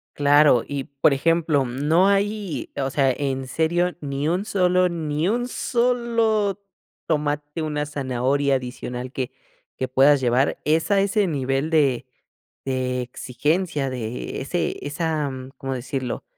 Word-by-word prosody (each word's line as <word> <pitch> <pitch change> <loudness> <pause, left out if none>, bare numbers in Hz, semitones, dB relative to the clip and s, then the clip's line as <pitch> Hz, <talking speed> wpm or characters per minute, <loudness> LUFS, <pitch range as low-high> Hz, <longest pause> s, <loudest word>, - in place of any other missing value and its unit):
Claro 145 -3 +5
y 140 -2 -4
por 140 +1 +2
ejemplo, 155 -1 +2
mm, 130 +4 -3
¿no 175 +4 +5
hay, 200 -2 -1
o 135 - 0
sea, 135 -1 +2
en 135 0 -2
serio 175 +5 0
ni 145 0 -2
un 180 +4 0
solo 180 -2 +3
ni 160 -2 -2
un 240 +4 0
solo 230 -5 +1 0.4
tomate, 150 0 -1
una 150 -1 -2
zanahoria 140 0 0
adicional 125 0 -5
que 130 -2 -3 0.5
que 130 - -2
puedas 135 +2 +5
llevar, 125 +2 +2
es 160 +4 +1
a 200 -1 +4
ese 200 0 +1
nivel 135 -1 -1
de 135 -6 +2 0.6
de 130 -1 -1
exigencia 140 +5 -1
de 125 -2 -5
e - - -4
ese 170 +6 -2
esa-?, 155 -1 -1
mm, 130 0 -8
¿cómo 135 -1 -4
decirlo?, 130 -1 -4
145 Hz, 145 wpm, -23 LUFS, 130-175 Hz, 0.6 s, Claro